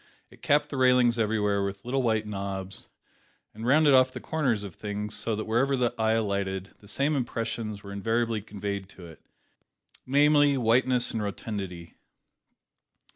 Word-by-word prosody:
It - - -18
capped 145 +1 +2
the 140 - -5
railings 125 -2 +4
everywhere 105 -2 +1
with 100 +1 -5
little 135 +2 0
white 110 -3 +1
knobs, 100 -2 -5 0.6
and 110 +2 -6
rounded 145 +1 +5
off 130 0 +5
the - - -7
corners 130 -10 -1
of 100 -4 -8
things 105 +2 -5
so, 115 - +1
that 110 - -4
wherever 130 +5 +1
the 120 -1 0
eye 110 -1 +1
alighted, 100 -3 -2
the 100 - -17
same 140 +8 0
impressions 115 -4 -3
were 100 - -9
invariably 115 +2 -1
conveyed 100 -1 -5
to 90 - -13
it, 80 -3 -14 0.9
namely, 145 +1 +4
whiteness 125 +1 +3
and 110 - -3
rotundity. 95 -4 -6
110 Hz, 155 wpm, -27 LUFS, 100-125 Hz, 0.9 s, rounded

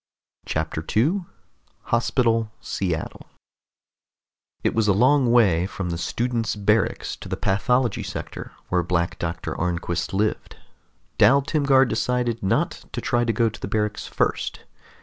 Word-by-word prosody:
CHAPTER 80 0 -2
2 160 - 0 0.7
HOSPITAL 115 -2 +2
SEATTLE 85 -4 -4 1.4
It - - +1
was 110 -2 +1
a 100 - +5
long 130 +4 +4
way 95 -8 +4
from 90 -3 -4
the 85 - -2
students' 115 +3 -1
barracks 105 +2 +1
to - - -10
the - - -2
pathology 120 +4 +1
sector - - -6 0.2
where 90 -1 +2
Black 85 +1 -1
Doctor 85 -1 -3
Arnquist 85 -1 -2
lived. 105 +2 -1 0.6
Dal 140 +1 +6
Timgar 140 -2 +3
decided 125 -2 -1
not 95 - 0
to - - -2
try 120 0 +1
to 120 - +1
go 115 +1 +2
to 110 - -5
the - - -3
barracks 105 +1 -2
first. - - -1
110 Hz, 135 wpm, -23 LUFS, 90-125 Hz, 1.4 s, Dal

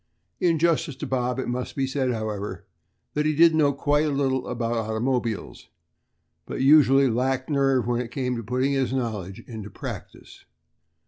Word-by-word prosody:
In 170 -2 +2
justice 160 -3 +1
to - - -6
Bob, 125 -1 -1
it 130 - -3
must 125 +1 -3
be 135 - 0
said, 130 -1 -1
however, 110 -3 -4 0.5
that 150 +1 +1
he 155 - +1
did 165 +1 +6
know 150 -3 +3
quite 145 +2 +1
a - - +1
little 135 -2 0
about 115 -1 -2
automobiles, 115 0 -2 0.8
but - - -5
usually 135 -1 +6
lacked 130 +3 -1
nerve 135 -4 +2
when 120 0 0
it 120 - -6
came 125 -1 -2
to 115 - -4
putting 130 +5 0
his 135 -2 0
knowledge 105 -7 -3
into 110 -4 -8
practice. - - -9
130 Hz, 170 wpm, -25 LUFS, 120-140 Hz, 0.8 s, did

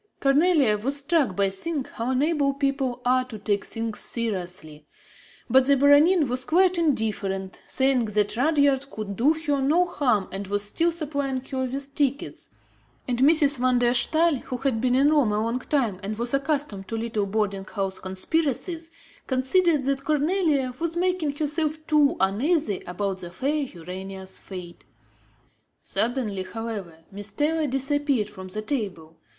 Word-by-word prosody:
Cornélie 275 - +3
was 275 +3 +3
struck 285 - +1
by 195 0 +1
seeing 285 +9 -2
how 230 -1 -5
unable 280 +1 +1
people 275 -3 -1
are 255 +1 +3
to 240 -4 -8
take 205 -1 -1
things 225 -1 -4
seriously; 180 -9 -4 0.6
but 265 0 +4
the 280 0 +5
Baronin 290 +4 +5
was 250 +1 -1
quite 360 +5 +3
indifferent, 205 - -1
saying 265 -3 +2
that 210 0 0
Rudyard 280 0 +2
could 215 -6 -6
do 270 +9 +3
her 300 -3 -1
no 315 +7 +3
harm 245 - 0
and 195 +1 -5
was 205 +1 -1
still 330 +12 +1
supplying 285 -5 -2
her 260 0 -3
with 275 +2 -5
tickets; 280 -1 -2 0.6
and 245 -1 -1
Mrs. 285 -1 +4
van 255 0 +3
der 245 0 +3
Staal, 315 +4 +2
who 250 0 -6
had 260 -4 -1
been 250 0 +2
in 280 +3 +4
Rome 280 -9 +3
a 210 - +1
long 230 +2 -1
time 245 -9 -1
and 210 +2 -4
was 235 +2 -1
accustomed 275 -8 -1
to 225 - -3
little 220 -3 -2
boarding 195 -2 -1
house 195 -3 -3
conspiracies, 320 - -2 0.4
considered 290 +4 +2
that 275 +1 0
Cornélie 300 -3 0
was 335 0 -2
making 355 -5 0
herself 305 +1 0
too 300 +1 +3
uneasy 220 - +1
about 190 +1 -3
the 175 - -7
fair 280 - -1
Urania's 190 0 -7
fate. 180 -3 -9 1.0
Suddenly, 230 -5 -1
however, 200 -6 -6
Miss 205 +1 -6
Taylor 300 +8 0
disappeared 270 -4 +1
from 190 -2 -9
the 215 +3 -5
table. 190 - -4
255 Hz, 155 wpm, -25 LUFS, 210-290 Hz, 1.0 s, the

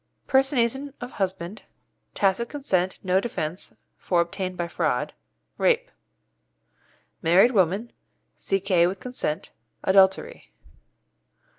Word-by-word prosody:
Personation 270 0 +1
of 245 +1 -7
husband 190 0 -3
Rape. - - -39
Tacit 200 +4 +1
consent 190 -11 -1
no 185 0 +3
defence, 180 -5 -4 0.2
for 175 - 0
obtained 185 +2 -2
by 175 - -2
fraud. - - -1 2.1
Married 180 +9 +5
woman 200 +2 +1 0.4
C.K. 190 -3 +2
with 185 +2 -4
consent 245 -11 -4 0.3
Adultery. 190 - +2
195 Hz, 95 wpm, -25 LUFS, 180-240 Hz, 2.1 s, Married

